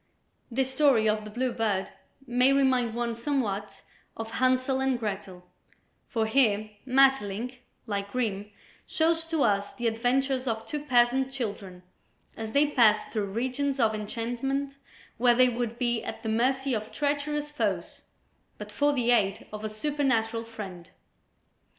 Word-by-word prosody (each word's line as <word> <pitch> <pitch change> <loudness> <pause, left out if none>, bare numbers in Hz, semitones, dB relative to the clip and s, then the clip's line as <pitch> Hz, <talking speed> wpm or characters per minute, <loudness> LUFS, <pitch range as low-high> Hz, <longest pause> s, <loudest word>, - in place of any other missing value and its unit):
This 260 +2 0
story 265 -5 +4
of 215 0 0
"The - - -7
Blue 250 +4 -1
Bird" 215 -5 -1 0.3
may 250 +1 +3
remind 260 -4 +2
one 235 -1 -1
somewhat 225 -5 -2 0.3
of 225 0 -5
"Hansel 255 +2 +1
and 265 -1 +1
Gretel," 195 -4 -5 0.6
for 225 -3 0
here 215 -3 +2 0.2
Maeterlinck, 250 -3 +2 0.3
like 200 -2 -3
Grimm, 210 -5 -2 0.4
shows 325 0 +1
to 325 -3 0
us 200 -2 +1
the 240 - -6
adventures 255 +3 +1
of 225 -1 -2
two 300 - -4
peasant 260 0 +3
children 200 -8 -5 0.5
as 220 -1 -6
they 285 +1 +5
pass 235 -7 +4
through 215 -3 0
regions 260 +5 -1
of 225 -2 +3
enchantment 245 +6 -3 0.4
where 240 0 +5
they 255 +1 +5
would 235 -1 -3
be 240 -2 0
at 225 - -6
the 220 - -2
mercy 260 +4 +1
of 215 -1 -3
treacherous 295 0 -1
foes, 295 - -2 0.6
but - - -8
for 290 0 +2
the 245 -3 +1
aid 200 -5 +2
of 210 0 -6
a 215 - -2
supernatural 230 -2 0
friend. 195 -7 -9
240 Hz, 145 wpm, -28 LUFS, 215-265 Hz, 0.6 s, they